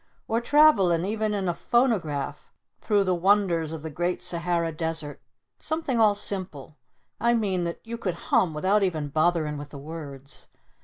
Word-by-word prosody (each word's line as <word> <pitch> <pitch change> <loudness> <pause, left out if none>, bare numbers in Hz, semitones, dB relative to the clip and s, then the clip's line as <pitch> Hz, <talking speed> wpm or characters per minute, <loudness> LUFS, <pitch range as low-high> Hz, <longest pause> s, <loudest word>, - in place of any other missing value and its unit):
Or 230 +1 0
travellin' 220 - +4
even 215 +1 -1
in 195 -2 -2
a 175 - +1
phonograph 190 - -1 0.3
through 205 -2 +2
the 185 -1 +1
wonders 175 -3 +2
of 160 -2 -6
the 160 - -5
great 175 +4 -2
Sahara 170 -1 0
Desert. 160 -2 -3 0.4
Something 315 -6 -2
all 215 -2 +5
simple 185 -8 -5 0.4
I 235 +1 +3
mean 190 -6 0
that 170 - -5
you 230 0 -6
could 185 -7 -2
hum 170 -1 +1
without 190 +7 +2
even 160 -6 -1
botherin' 155 -1 +1
with 145 0 -8
the 145 - -10
words. 140 -2 -9
175 Hz, 160 wpm, -26 LUFS, 160-210 Hz, 0.4 s, all